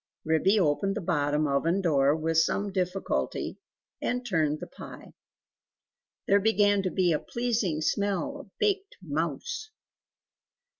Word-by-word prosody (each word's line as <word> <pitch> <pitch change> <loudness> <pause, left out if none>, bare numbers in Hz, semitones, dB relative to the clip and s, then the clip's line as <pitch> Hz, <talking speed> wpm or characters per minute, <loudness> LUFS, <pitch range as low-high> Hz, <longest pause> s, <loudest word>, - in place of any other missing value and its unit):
Ribby 175 +7 +3
opened 190 +4 +1
the 215 - -2
bottom 150 -3 +1
oven 155 +6 +1
door 145 -5 +3
with 160 0 +1
some 200 +5 +1
difficulty, 185 0 -2 0.4
and 250 0 -1
turned 155 -8 +1
the - - -6
pie. - - -11 1.1
There 200 - +5
began 205 -1 +3
to 190 - -1
be 180 -1 +2
a 150 - +1
pleasing 230 -10 -1
smell 200 - -1
of 280 - -12
baked 400 -1 0
mouse! 185 - -3
185 Hz, 130 wpm, -28 LUFS, 160-210 Hz, 1.1 s, There